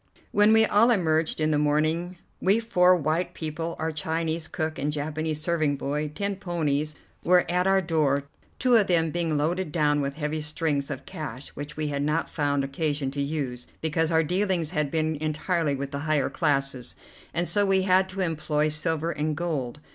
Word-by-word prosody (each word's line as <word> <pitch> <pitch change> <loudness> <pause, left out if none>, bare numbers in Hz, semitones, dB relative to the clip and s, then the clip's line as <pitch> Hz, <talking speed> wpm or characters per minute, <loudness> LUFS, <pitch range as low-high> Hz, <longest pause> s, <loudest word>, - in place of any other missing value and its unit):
When 205 +1 +5
we 220 0 +6
all 215 +3 +4
emerged 160 -8 +2
in 155 0 +2
the 150 - +2
morning, 155 +4 +1 0.2
we 200 +4 +3
four 185 -6 +4
white 170 +2 -1
people, 165 +1 -4
our 160 0 -2
Chinese 160 +1 -2
cook 160 -5 -3
and 145 +2 0
Japanese 155 +1 -2
serving 155 -3 +1
boy, 145 +2 -2
ten 200 -1 -2
ponies 155 -5 -1 0.3
were 180 0 +4
at 180 +2 +1
our 195 0 +4
door, 150 -5 +1 0.3
two 250 -2 +4
of 205 -3 +3
them 165 -3 +2
being 165 -2 0
loaded 165 +3 -1
down 150 -2 +2
with 140 0 -3
heavy 155 0 -2
strings 150 -2 -1
of - - -6
cash 150 -6 -7
which 145 +2 -8
we 155 -1 -1
had 140 -1 -2
not 150 +3 0
found 145 -2 0
occasion 145 0 -1
to 140 +1 -3
use, 140 -4 -3
because 160 0 0
our 160 -1 +3
dealings 180 -1 0
had 150 -5 0
been 155 0 0
entirely 155 0 0
with 140 +1 -5
higher 145 0 0
classes 135 -5 0 0.4
and 170 +1 0
so 205 - +2
we 195 -1 +3
had 185 -1 +4
had 190 0 +1
to 190 +1 -4
employ 155 -3 0
silver 160 +2 -1
and 150 0 -2
gold. 150 -6 -3
155 Hz, 185 wpm, -26 LUFS, 150-175 Hz, 0.4 s, we